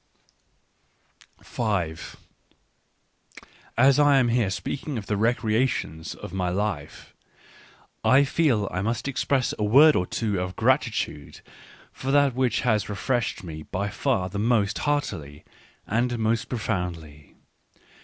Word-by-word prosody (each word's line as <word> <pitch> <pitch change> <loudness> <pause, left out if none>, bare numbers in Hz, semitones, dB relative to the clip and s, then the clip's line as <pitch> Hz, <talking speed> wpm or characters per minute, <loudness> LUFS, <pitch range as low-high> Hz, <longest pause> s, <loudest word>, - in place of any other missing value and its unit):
5 95 -9 -3 1.6
As 135 +3 +5
I 145 -1 +5
am 120 -4 +2
speaking 140 +9 -4
here - - -3
of 105 - -5
the 105 - -1
recreations 110 -7 0
of - - -9
my 90 -2 -1
life, 90 -6 -4 0.9
I 135 +2 +5
feel 135 -8 +1
I 95 - -2
must 115 +5 -2
express 135 -1 0
a - - 0
word 140 +9 +6
or 90 - 0
two 105 -5 -2
of 90 0 -4
gratitude 115 - -1 0.5
for 130 - -6
that 140 -1 +4
which 125 -2 0
has 110 -5 +1
refreshed 120 +3 -2
me 80 -3 -7
by 100 +5 -3
far 105 -2 -1
the 100 +2 -5
most 110 -2 +1
heartily 100 - -2 0.4
and 120 +3 0
most 110 0 0
profoundly. 90 - -4
110 Hz, 125 wpm, -25 LUFS, 95-130 Hz, 1.6 s, word